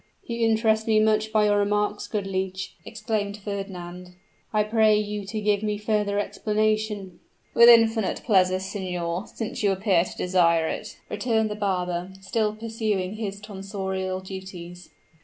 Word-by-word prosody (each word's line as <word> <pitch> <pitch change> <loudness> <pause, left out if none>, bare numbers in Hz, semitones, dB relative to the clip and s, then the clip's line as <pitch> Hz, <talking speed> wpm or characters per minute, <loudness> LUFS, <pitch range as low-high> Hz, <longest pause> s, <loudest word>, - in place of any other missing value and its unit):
"You 230 -1 0
interest 220 0 +2
me 215 -1 +4
much 215 0 +2
by 215 -1 +3
your 205 0 +3
remarks, 210 0 0
good 210 -3 -2
leech," 190 0 -3
exclaimed 215 -2 -3
Fernand; 180 -3 -6 0.4
"I 215 -1 +2
pray 215 0 +4
you 210 -1 -3
to 215 +2 -3
give 205 -1 +1
me 210 -1 -1
further 210 -1 0
explanation." 210 -3 -1 0.3
"With 235 0 +8
infinite 225 -3 +4
pleasure, 185 -4 +4
signor, 185 -1 -3
since 225 - -5
you 205 -2 +3
appear 190 -3 +2
to - - -9
desire 170 -3 +3
it," - - -5
returned 220 0 0
the - - -3
barber, 180 -3 -2
still 210 +2 -1
pursuing 215 -3 -2
his 200 -3 -4
tonsorial 190 -2 -4
duties. 185 -2 -9
205 Hz, 145 wpm, -25 LUFS, 190-215 Hz, 0.4 s, With